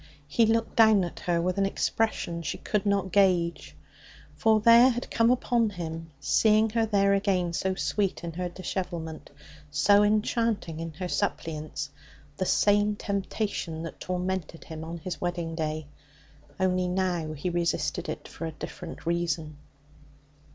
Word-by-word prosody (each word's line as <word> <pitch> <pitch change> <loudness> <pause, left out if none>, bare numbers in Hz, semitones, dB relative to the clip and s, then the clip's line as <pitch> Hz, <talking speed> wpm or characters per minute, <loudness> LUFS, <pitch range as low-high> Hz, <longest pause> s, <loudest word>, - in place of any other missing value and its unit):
He 220 +10 +3
looked 230 0 +1
down 220 -4 +6
at 175 - -5
her 175 -1 0
with 180 +3 0
an 195 - +3
expression 195 -5 -1
she 150 -4 -3
could 210 -1 -1
not 200 -2 +1
gauge. 180 -3 +2 0.6
For 220 -1 +3
there, 235 +3 +7
had 245 0 -3
come 230 0 +3
upon 240 -2 +2
him, 165 -3 -6
seeing 215 +7 +3
her 225 0 +1
there 200 -2 +3
again, 190 -4 +1
so 190 +2 -1
sweet 185 +5 -1
in 170 -1 -5
her 180 +1 -3
dishevelment, 175 -3 -5 0.4
so 200 +8 +4
enchanting 210 -4 +1
in 165 -1 -5
her 180 +3 -4
suppliance, 155 -4 -3 0.5
the 185 - -1
same 205 0 +3
temptation 200 -5 -3
that 165 - -7
tormented 180 -2 -3
him 160 -1 -8
on 165 +1 -6
his 175 +2 -6
wedding 175 -2 -2
day. 155 -1 -3 0.7
Only 185 -1 +1
now 180 -4 -1
he 155 +4 -3
resisted 170 0 -1
it - - -5
for 165 - -6
a 160 - -6
different 165 +2 -8
reason. 165 -3 -1
180 Hz, 150 wpm, -27 LUFS, 165-205 Hz, 0.7 s, there